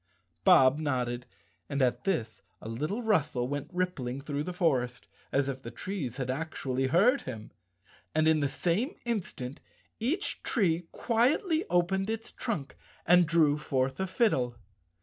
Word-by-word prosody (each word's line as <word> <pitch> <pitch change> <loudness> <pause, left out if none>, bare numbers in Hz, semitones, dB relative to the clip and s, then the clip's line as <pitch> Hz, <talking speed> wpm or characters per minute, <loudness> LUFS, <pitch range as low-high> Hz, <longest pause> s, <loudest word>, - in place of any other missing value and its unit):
Bob 130 +3 +6
nodded, 125 -5 -1 0.4
and 140 -1 -1
at 125 -2 +1
this 120 - -1 0.2
a - - -9
little 150 - -3
rustle 155 - +1
went 145 +1 -4
rippling 175 -9 -2
through 145 0 -3
the 180 - -4
forest 130 -9 0 0.2
as 140 0 +2
if 135 -1 -4
the 115 - -7
trees 135 - -5
had 130 -2 -2
actually 135 -3 -2
heard 205 - +4
him, 110 -1 -7 0.6
and 155 0 +3
in 160 -1 +4
the 145 -2 +1
same 180 - 0
instant 170 - -3 0.4
each 305 - -1
tree 175 -7 +1
quietly 310 - +1
opened 190 +3 +1
its 225 0 -3
trunk 155 - -4 0.3
and 175 -1 +6
drew 150 -2 +4
forth 135 -1 -1
a 190 - 0
fiddle. 135 - +1
155 Hz, 150 wpm, -30 LUFS, 130-190 Hz, 0.6 s, Bob